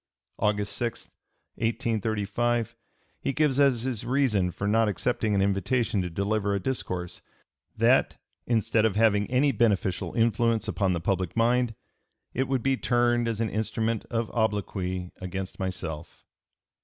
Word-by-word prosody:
August 105 -1 0
6, 120 -1 -4 0.5
1835, 115 0 -1 0.4
he 135 - -1
gives 145 -3 +2
as 135 -5 +4
his 125 -5 -2
reason 120 -7 +2
for 100 +3 -4
not 110 +2 +3
accepting 105 +1 0
an 100 - +3
invitation 105 +2 +1
to 90 - -3
deliver 100 +3 0
a - - 0
discourse, 90 -7 -3 0.6
that - - +3 0.3
"instead 115 -1 +2
of 110 -3 +2
having 105 -2 +3
any 130 +3 +3
beneficial 105 -5 +1
influence 115 -1 +2
upon 95 -4 +1
the 85 - -1
public 90 +2 -1
mind, 120 0 +2 0.6
it 130 +2 0
would 130 -3 0
be 135 0 +2
turned 120 -1 +2
as 115 -1 -1
an 110 - 0
instrument 110 +1 -1
of 115 -1 -2
obloquy 95 -5 -1
against 95 +1 -6
myself." 85 -4 -5
110 Hz, 140 wpm, -27 LUFS, 100-120 Hz, 0.6 s, as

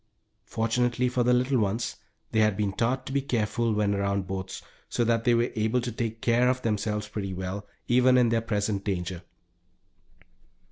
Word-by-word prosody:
Fortunately 120 +3 0
for 125 0 0
the 120 +1 +3
little 125 +1 +2
ones 110 +3 -1 0.3
they 110 - +2
had 110 -2 +3
been 105 -2 0
taught 125 +6 0
to - - -6
be 140 - +2
careful 115 -3 0
when 105 -1 +1
around 100 -1 0
boats, 95 0 -5 0.3
so 120 - 0
that 115 0 +1
they 120 -1 +5
were 120 +1 +1
able 110 +3 +1
to 120 0 -3
take 115 0 -4
care 120 +1 +3
of 125 0 -1
themselves 105 -1 -1
pretty 100 -3 -4
well, 95 +3 -5 0.2
even 125 +1 +5
in 120 -2 +4
their 115 0 +2
present 105 -2 -1
danger. 90 -3 -3
115 Hz, 180 wpm, -27 LUFS, 100-120 Hz, 0.3 s, they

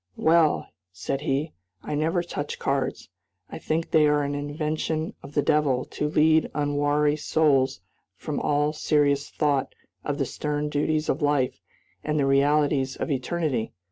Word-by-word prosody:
"Well," 160 -1 +3 0.2
said 95 +9 -4
he, 150 +1 -1 0.3
"I - - -4
never 160 +4 0
touch 145 -4 -5
cards. - - -2 0.4
I - - -6
think 160 +1 -2
they 155 -2 +5
are 150 0 +2
an 140 0 -2
invention 155 +2 -2
of 140 +1 -12
the 145 - +2
devil 140 -4 +2
to 150 - -3
lead 155 +1 +3
unwary 145 0 +1
souls 140 - +1 0.3
from - - -4
all 150 +1 +1
serious 145 -2 +1
thought 145 -3 0 0.3
of 145 -1 -2
the 140 - 0
stern 150 +3 -3
duties 155 +1 0
of 145 - -1
life 145 -3 +1 0.4
and 150 0 -1
the 140 - +2
realities 140 -1 +2
of - - -3
eternity! 135 -3 -1
150 Hz, 150 wpm, -25 LUFS, 140-155 Hz, 0.4 s, they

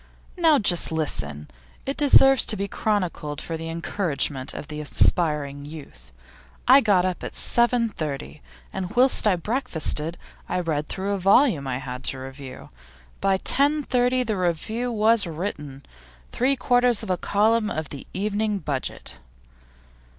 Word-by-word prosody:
Now 325 -4 +4
just 185 -9 +2
listen; 75 - -3 0.4
it 275 - -3
deserves 270 -3 +5
to 215 - +1
be 200 +1 -2
chronicled 180 -9 -2
for 165 - -5
the 165 0 -6
encouragement 155 -5 -3
of 150 - -8
aspiring 150 -1 0
youth. 150 - -12 0.6
I 265 +3 +8
got 195 -6 +3
up 185 -1 -3
at - - -6
7.30, 225 - -1 0.3
and 190 +1 -5
whilst 250 -2 +4
I 200 - +4
breakfasted 170 - -1 0.3
I - - -1
read 155 -4 -2
through 195 +1 -3
a 200 - -2
volume 195 - +3
I 125 -1 -2
had 125 0 -7
to 135 - 0
review. 130 0 -10 0.5
By 195 -1 +2
10.30 255 -1 +2
the 215 -3 -2
review 200 +8 -2
was 220 -2 +3
written 150 -5 -6 0.5
three 265 +3 +1
quarters 245 -3 +2
of 200 - -3
a - - +2
column 215 +4 +1
of 155 -1 -4
the 140 - -9
Evening 210 +2 -1
Budget. 145 -7 -4
185 Hz, 140 wpm, -24 LUFS, 150-230 Hz, 0.6 s, I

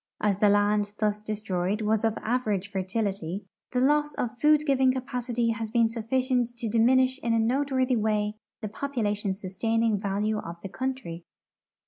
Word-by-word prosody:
As 205 -2 +1
the 210 - +5
land 205 0 +2
thus 210 -1 0
destroyed 210 -2 -2
was 215 +1 +1
of 225 -1 +1
average 215 -5 -1
fertility, 195 -2 -2 0.3
the 250 - 0
loss 295 +3 +2
of 240 0 -4
food 300 0 +5
giving 265 -2 +3
capacity 250 -2 -2
has 225 -1 -4
been 230 0 +3
sufficient 245 +2 0
to 235 - -3
diminish 255 +4 +3
in 230 -1 +1
a - - +2
noteworthy 260 +2 +1
w^ay 210 -1 0 0.3
the 215 - -3
population 210 -5 -2
sustaining 220 +3 0
value 205 +2 -1
of 170 -3 -7
the 195 - -5
country. 255 -9 -4
225 Hz, 155 wpm, -27 LUFS, 205-250 Hz, 0.3 s, the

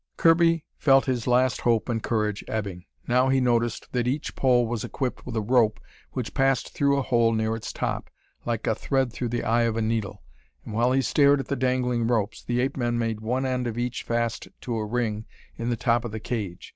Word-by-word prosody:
Kirby 165 -1 +4
felt 135 -2 +5
his 125 -3 -1
last 125 0 +2
hope 115 -3 +2
and 115 -2 -1
courage 105 -3 -1
ebbing. 100 -5 -4 0.2
Now 125 +2 +3
he 135 0 +3
noticed 120 -2 0
that 125 -1 0
each 140 +4 -2
pole 125 -2 +3
was 115 -2 -3
equipped 130 -2 -4
with 125 - -5
a 110 - +1
rope 115 -1 +3 0.3
which - - -4
passed 135 -2 +1
through 140 -1 +2
a 140 - 0
hole 115 -3 +2
near 110 0 0
its 115 - -6
top, - - -3 0.3
like 115 -2 -2
a - - +2
thread 130 +1 -1
through 120 +1 -3
the 120 +1 -2
eye 115 +1 +2
of 115 -1 +1
a - - 0
needle. 110 -3 -2 0.4
And 110 - -7
while 120 +3 +2
he 135 +1 +2
stared 140 0 +4
at 135 - -5
the 140 - 0
dangling 125 -2 0
ropes, 110 -3 -1
the 120 0 0
ape 135 +2 -1
men 120 -2 0
made 115 -2 -1
one 125 +4 -1
end 125 -1 -1
of 115 -1 -4
each 125 +1 -2
fast 115 -1 -2
to 120 - -3
a 105 -1 -2
ring 110 -2 -2 0.3
in 115 +1 -3
the 120 - 0
top 120 0 +1
of 120 - -5
the 110 - -5
cage. 105 -6 -5
120 Hz, 220 wpm, -25 LUFS, 115-130 Hz, 0.4 s, felt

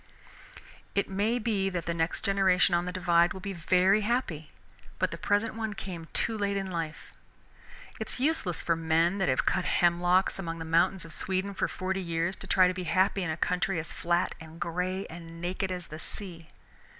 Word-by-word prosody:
It 200 -1 0
may 210 +5 +1
be 210 -4 0
that 175 -3 -3
the 170 - -1
next 165 0 -1
generation 195 -2 +4
on 175 0 +2
the 180 - -3
Divide 175 -1 +3
will 190 - -7
be 195 +1 -5
very 185 +4 +3
happy, 205 - -1 0.5
but - - 0
the - - -3
present 205 +2 +1
one 220 -2 -3
came 175 -4 -7
too 225 - +1
late 200 -1 0
in 195 -1 -3
life. 165 -2 -5 0.9
It - - -4
is - - -5
useless 265 - +1
for 165 - +2
men 165 +4 +2
that 190 - +2
have 130 - +1
cut 180 - +1
hemlocks 175 +2 +3
among 165 -3 -4
the 165 - -6
mountains 165 +2 +2
of 165 - -10
Sweden 190 +4 -1
for - - 0
forty 190 +1 -2
years 170 +1 -1
to 195 - -8
try 185 0 +5
to 180 - 0
be 185 0 -5
happy 190 +3 +2
in 180 - -2
a 160 - -2
country 180 +2 0
as 155 - -5
flat 175 +1 0
and 160 +1 -11
gray 180 +3 -2
and 165 0 -10
naked 185 +2 -2
as 180 -1 -4
the 155 -1 -9
sea. 170 -4 -7
180 Hz, 200 wpm, -29 LUFS, 170-195 Hz, 0.9 s, try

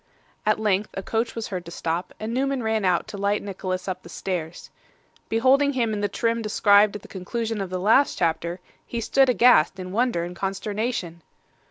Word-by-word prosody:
At 215 - +3
length 210 -1 +1
a 195 - -4
coach 225 +3 -1
was 230 -1 -4
heard 185 -3 -4
to - - -8
stop, 170 +1 -3
and 220 +2 -4
Newman 270 0 0
ran 220 -2 0
out 180 -2 +2
to 200 - -7
light 200 +1 0
Nicholas 185 -2 -4
up 185 - -3
the 170 - -13
stairs. 175 -2 -5 0.6
Beholding 265 +5 +3
him 235 -4 0
in 205 - -2
the 205 - 0
trim 230 0 0
described 210 -1 +4
at 210 - -7
the - - -12
conclusion 220 +3 -3
of 190 - -4
the 185 - -3
last 225 +9 +3
chapter, 170 +1 -1 0.2
he 235 - -5
stood 265 +4 +3
aghast 235 -7 +5
in 185 0 -6
wonder 230 -5 +1
and 175 +1 -6
consternation. 195 -2 -3
205 Hz, 195 wpm, -24 LUFS, 185-230 Hz, 0.6 s, aghast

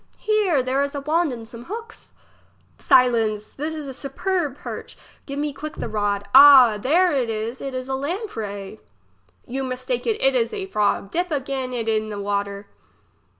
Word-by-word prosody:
Here, 405 -10 +1
there 260 +2 0
is 280 0 -2
a 285 - -3
wand 315 +2 +1
and 230 -2 -8
some 235 0 -11
hooks. 455 - -9 0.7
Silence! 225 -4 +3
there 295 +2 -5
is 310 -2 -5
a 265 - -6
superb 295 +2 -2
perch! - - -8 0.3
Give 280 -1 -5
me 295 0 -2
quick 305 +2 -7
the - - -4
rod. 205 -2 -1
Ah! 265 -6 +9
there 340 - +3
is, 230 -3 -2
it 270 -1 -5
is 255 0 -4
a 265 - -3
lamprey. 230 - -5 0.7
You 270 +2 -4
mistake 260 - -3
you, 445 -2 +1
it - - +3
is 460 -3 0
a 395 -2 -4
frog! 210 - 0
dip 355 +2 -1
again 270 -3 -3
it 235 -3 -3
in 215 -1 0
the 205 -1 -5
water. 200 0 -3
265 Hz, 175 wpm, -22 LUFS, 225-315 Hz, 0.7 s, Ah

